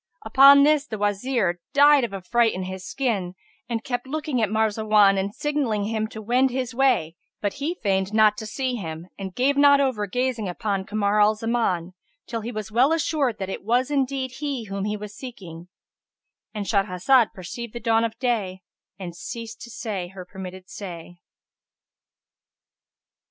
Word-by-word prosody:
Upon 280 +1 +8
this 300 0 +3
the 220 - -5
Wazir, 205 -2 0
died 290 -1 +6
of 235 - -2
affright 225 +4 +1
in 185 - -3
his 185 0 -6
skin, 200 -8 -2 0.3
and 230 -2 -2
kept 245 0 -3
looking 295 -3 -2
at 215 - +1
Marzawan 215 -2 +3
and 195 +1 -2
signalling 270 -6 -1
him 220 +1 -1
to 220 0 -9
wend 250 +4 +3
his 255 -1 -3
way; 235 -11 +2 0.2
but 205 - -2
he 325 +5 -1
feigned 190 -1 +1
not 215 -1 +4
to 220 - -6
see 260 +3 -2
him 165 -6 -6
and 190 -2 -6
gave 270 +3 +2
not 285 0 +6
over 255 -7 0
gazing 245 -2 -1
upon 195 0 -2
Kamar 210 0 +1
al 210 +1 +4
Zaman, 215 -6 -1 0.3
till 230 -1 -4
he 230 +3 -5
was 215 -2 -6
well 250 +7 +4
assured 300 -7 0
that 190 - -4
it - - -6
was 245 +6 +1
indeed 270 -2 -1
he 280 -5 -3
whom 195 -1 -4
he 210 0 -2
was 210 0 -8
seeking,—And 195 0 -11
Shahrazad 205 +5 +3
perceived 210 +5 -7
the 235 - -5
dawn 225 -1 +2
of 230 -1 -3
day 205 -8 -2 0.3
and 180 -3 -7
ceased 230 +5 -7
to - - -9
say 205 -6 -4
her 185 0 -10
permitted 185 -1 -9
say. 175 -3 -9
220 Hz, 165 wpm, -24 LUFS, 195-255 Hz, 0.3 s, Upon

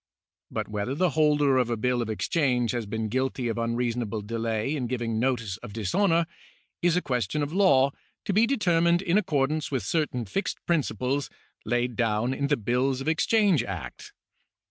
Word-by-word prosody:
But - - -3
whether 105 +5 -3
the 180 +1 +2
holder 150 -3 +3
of 125 -2 +2
a 120 - -1
bill 125 +2 0
of 115 - -3
exchange 125 +1 +1
has 120 -4 -3
been 110 +1 -2
guilty 130 +2 -1
of 115 - -2
un 115 0 -1
reasonable 115 -3 -2
delay 115 +4 -2
in 130 -5 -2
giving 115 -2 -2
notice 115 -6 -1
of 100 - -10
dishonour, 165 - +2 0.6
is 175 0 +3
a 180 - 0
question 125 +3 -1
of 145 +2 -4
law 140 -9 +4 0.3
to 200 - -1
be 220 +4 +4
determined 175 -8 +2
in 190 +2 +3
accordance 155 -4 0
with 130 -4 -2
certain 150 -7 -1
fixed 195 - -2
principles 140 - 0 0.4
laid 120 +1 0
down 115 +1 +1
in 140 +1 -1
the 145 0 +2
Bills 125 +4 0
of 135 - -6
Exchange 190 - +3
Act. 85 - -7
130 Hz, 175 wpm, -26 LUFS, 115-155 Hz, 0.6 s, law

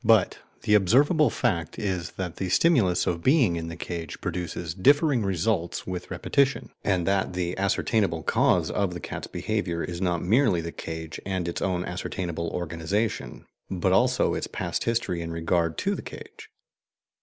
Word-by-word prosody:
But - - +4 0.2
the 105 - +2
observable 140 - +5
fact 85 - -1
is 95 -6 -2
that 90 -3 -5
the 95 - -2
stimulus 105 - +3
of 85 -1 -1
being 130 - +4
in 80 -1 -4
the 85 - -6
cage 85 -2 -6
produces 85 -2 -4
differing 140 - +4
results 95 -2 -1
with 90 -1 -5
repetition, 140 0 0
and 90 -4 +1
that 95 -1 +1
the 90 -1 -2
ascertainable 100 -3 0
cause - - +2
of 95 -3 -1
the - - -4
cat's - - -6
behaviour 95 -6 -2
is 85 +1 -5
not 90 -3 0
merely 110 -1 +3
the 85 0 -4
cage 80 -1 -6
and 95 -3 -2
its 85 - -3
own 90 -2 0
ascertainable 85 -2 -3
organization, 90 +5 -2 0.2
but 90 -3 +1
also - - +3
its - - -2
past - - -3
history 115 -7 0
in 85 0 -5
regard 85 -1 0
to - - 0
the - - -4
cage. - - -11
90 Hz, 165 wpm, -26 LUFS, 85-105 Hz, 0.2 s, observable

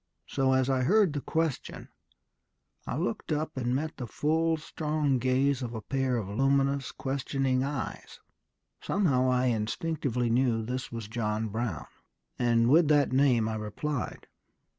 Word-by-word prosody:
So, 135 -1 +1
as 130 -1 +2
I 135 -1 +1
heard 195 +4 +3
the 145 - -2
question, 160 -3 -2 1.0
I 125 - -2
looked 180 +3 -3
up 155 +1 -1
and 125 -1 -1
met 155 +3 -3
the 125 - -5
full, 160 +6 +1
strong 150 -3 -1
gaze 130 +2 +1
of 120 -2 -4
a 110 - -4
pair 135 +1 0
of 105 -5 -3
luminous, 135 +4 +1
questioning 135 -1 -1
eyes. 140 -2 -5 0.6
Somehow 140 -10 +2
I 125 0 +2
instinctively 125 +2 -1
knew 120 -2 +2
this 125 +3 -4
was 115 -3 -5
John 110 -1 -2
Brown, 110 -4 -3 0.5
and 115 -1 +3
with 155 +5 +5
that 145 -3 +3
name 130 -5 +3
I 110 - -2
replied.... 110 +5 -4
130 Hz, 145 wpm, -29 LUFS, 120-145 Hz, 1.0 s, with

